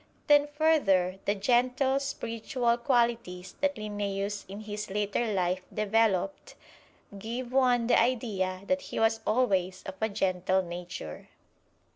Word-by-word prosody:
Then 290 Hz, 0 st, +5 dB
further, 280 Hz, -, +2 dB
the 205 Hz, -, +1 dB
gentle, 255 Hz, +5 st, +2 dB
spiritual 235 Hz, -2 st, -1 dB
qualities 235 Hz, -8 st, 0 dB
that 285 Hz, 0 st, +1 dB
Linnæus 205 Hz, -1 st, -3 dB
in 200 Hz, +2 st, -8 dB
his 210 Hz, 0 st, -6 dB
later 210 Hz, +3 st, -1 dB
life 185 Hz, -1 st, 0 dB
developed 215 Hz, +4 st, 0 dB, 0.6 s
give 240 Hz, +4 st, -5 dB
one 250 Hz, -3 st, +3 dB
the 235 Hz, -, +4 dB
idea 210 Hz, -7 st, -1 dB
that 275 Hz, +5 st, 0 dB
he -, -, -3 dB
was 225 Hz, 0 st, +3 dB
always 190 Hz, -6 st, +1 dB
of -, -, -6 dB
a 220 Hz, -, +1 dB
gentle 190 Hz, -2 st, 0 dB
nature. 175 Hz, -, -7 dB
215 Hz, 125 wpm, -29 LUFS, 190-250 Hz, 0.6 s, Then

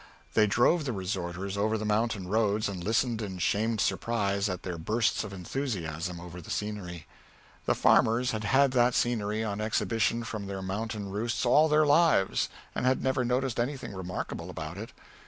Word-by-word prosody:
They 110 Hz, -1 st, +4 dB
drove 130 Hz, -, +3 dB
the 130 Hz, -, -1 dB
resorters 95 Hz, 0 st, -3 dB
over 110 Hz, +2 st, +1 dB
the 110 Hz, -, -4 dB
mountain 105 Hz, -2 st, 0 dB
roads 105 Hz, +1 st, +1 dB
and 95 Hz, -3 st, -5 dB
listened 115 Hz, +2 st, +1 dB
in 95 Hz, -3 st, -5 dB
shamed 110 Hz, +5 st, 0 dB
surprise 100 Hz, 0 st, 0 dB
at 90 Hz, -1 st, -4 dB
their 90 Hz, -3 st, -4 dB
bursts 110 Hz, +8 st, +1 dB
of 105 Hz, -, -7 dB
enthusiasm 90 Hz, -, -4 dB
over 90 Hz, 0 st, -9 dB
the -, -, -13 dB
scenery. 95 Hz, -6 st, -4 dB, 0.6 s
The -, -, +3 dB
farmers 120 Hz, +3 st, +4 dB
had 110 Hz, -1 st, -3 dB
had 135 Hz, +6 st, +4 dB
that 125 Hz, -1 st, +3 dB
scenery 110 Hz, -2 st, 0 dB
on 105 Hz, -1 st, -3 dB
exhibition 115 Hz, +1 st, 0 dB
from 110 Hz, -3 st, -5 dB
their 95 Hz, -1 st, -5 dB
mountain 100 Hz, +1 st, -4 dB
roosts 115 Hz, +5 st, -1 dB
all 150 Hz, +6 st, +5 dB
their 155 Hz, 0 st, +4 dB
lives, 145 Hz, -, +3 dB, 0.2 s
and -, -, -3 dB
had 130 Hz, +1 st, +2 dB
never 130 Hz, -1 st, +1 dB
noticed 125 Hz, 0 st, 0 dB
anything 130 Hz, -2 st, -2 dB
remarkable 95 Hz, -1 st, -5 dB
about 80 Hz, +1 st, -6 dB
it. 115 Hz, +4 st, -7 dB
105 Hz, 175 wpm, -29 LUFS, 95-120 Hz, 0.6 s, all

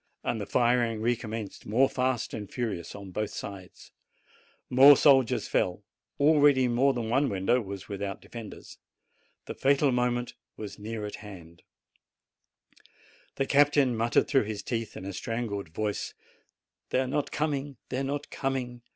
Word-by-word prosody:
And 115 Hz, -3 st, -2 dB
the 100 Hz, -, -5 dB
firing 120 Hz, -1 st, +2 dB
recommenced 110 Hz, -2 st, -3 dB
more 125 Hz, +6 st, +4 dB
fast 130 Hz, -3 st, -1 dB
and 105 Hz, -3 st, -6 dB
furious 105 Hz, -9 st, -4 dB
on 100 Hz, -2 st, -9 dB
both 105 Hz, +3 st, -2 dB
sides. 95 Hz, -2 st, -9 dB, 0.8 s
More 135 Hz, +3 st, +8 dB
soldiers 130 Hz, -5 st, +4 dB
fell. 90 Hz, +3 st, 0 dB, 0.4 s
Already 145 Hz, -3 st, +5 dB
more 125 Hz, +3 st, +3 dB
than 120 Hz, -4 st, -3 dB
one 135 Hz, +5 st, +2 dB
window 100 Hz, +6 st, +1 dB
was 100 Hz, -2 st, -7 dB
without 100 Hz, -1 st, -4 dB
defenders. 115 Hz, -3 st, -10 dB, 0.7 s
The -, -, -5 dB
fatal 140 Hz, +1 st, +3 dB
moment 125 Hz, 0 st, 0 dB, 0.2 s
was 105 Hz, 0 st, -8 dB
near 110 Hz, 0 st, -5 dB
at 105 Hz, -, -6 dB
hand. 85 Hz, -6 st, -12 dB, 1.7 s
The 135 Hz, -, 0 dB
captain 145 Hz, -3 st, +4 dB
muttered 115 Hz, +1 st, +2 dB
through 135 Hz, -6 st, +3 dB
his 105 Hz, -1 st, -5 dB
teeth, 115 Hz, -2 st, -4 dB
in 95 Hz, -, -8 dB
a 100 Hz, -, -5 dB
strangled 110 Hz, -4 st, -4 dB
voice, 105 Hz, +5 st, -3 dB, 0.7 s
"They -, -, +1 dB
are 130 Hz, -, +1 dB
not 145 Hz, +2 st, -1 dB
coming! 145 Hz, -3 st, -2 dB
they 130 Hz, -, -2 dB
are -, -, -1 dB
not 140 Hz, +1 st, -4 dB
coming!" 125 Hz, -3 st, -3 dB
120 Hz, 150 wpm, -28 LUFS, 105-135 Hz, 1.7 s, More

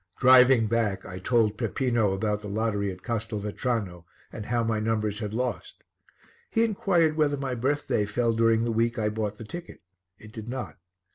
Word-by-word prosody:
Driving 130 Hz, -2 st, +6 dB
back, 105 Hz, -3 st, -1 dB
I 90 Hz, +1 st, -7 dB
told 110 Hz, 0 st, +1 dB
Peppino 120 Hz, -6 st, +1 dB
about 105 Hz, +2 st, -1 dB
the 105 Hz, -, -7 dB
lottery 105 Hz, -1 st, -1 dB
at 90 Hz, 0 st, -11 dB
Castelvetrano 105 Hz, -4 st, -3 dB, 0.3 s
and 105 Hz, -2 st, -7 dB
how 120 Hz, -1 st, +1 dB
my 115 Hz, -1 st, 0 dB
numbers 110 Hz, -1 st, -1 dB
had 105 Hz, -3 st, -4 dB
lost. 120 Hz, 0 st, -4 dB, 0.7 s
He 225 Hz, -, +2 dB
inquired 180 Hz, -7 st, +2 dB
whether 150 Hz, -2 st, +1 dB
my 135 Hz, -2 st, -3 dB
birthday 125 Hz, -4 st, 0 dB
fell 115 Hz, +2 st, 0 dB
during 115 Hz, 0 st, +3 dB
the 120 Hz, -, 0 dB
week 115 Hz, +1 st, 0 dB
I 105 Hz, -1 st, 0 dB
bought 105 Hz, -1 st, -3 dB
the -, -, -8 dB
ticket. 175 Hz, -, -9 dB, 0.3 s
It 110 Hz, +1 st, -14 dB
did 110 Hz, 0 st, -8 dB
not. 125 Hz, -7 st, -6 dB
115 Hz, 170 wpm, -26 LUFS, 105-125 Hz, 0.7 s, Driving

